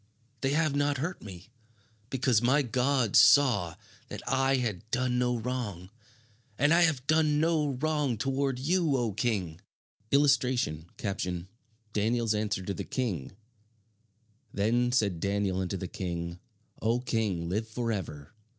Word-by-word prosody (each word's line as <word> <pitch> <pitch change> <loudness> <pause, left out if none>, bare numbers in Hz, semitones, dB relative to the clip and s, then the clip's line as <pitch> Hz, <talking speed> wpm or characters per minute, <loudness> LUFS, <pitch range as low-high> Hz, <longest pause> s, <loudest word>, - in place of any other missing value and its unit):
They 135 +1 +1
have 155 -2 +1
not 145 0 +1
hurt 165 +7 -4
me, 95 +1 -11 0.6
because 130 -4 +2
my 135 +4 +3
God 125 -1 +1
saw 105 - +5 0.3
that - - -7
I 135 0 +2
had 115 -4 -3
done 125 0 0
no 125 -1 +1
wrong. 110 -7 -4 0.7
And 145 +4 +4
I 170 - +5
have 155 -7 +2
done 155 0 +3
no 155 -3 +1
wrong 145 -2 0
toward 135 +2 -1
you, 160 +1 +1
O 120 -4 -1
king!" 95 -7 -2 0.5
[Illustration: 125 - +2 1.1
DANIEL'S 115 +1 +1
ANSWER 105 -3 -1
TO 100 - -3
THE - - -5
KING 100 - -3 1.2
"Then 120 +4 +1
said 100 -8 +1
Daniel 100 0 0
unto 95 +1 -2
the 95 - -5
King, 85 -1 -5 0.4
O 115 +2 +1
King, 105 -9 -1
live 105 +6 -2
forever. 105 -9 -4
120 Hz, 130 wpm, -29 LUFS, 100-135 Hz, 1.2 s, saw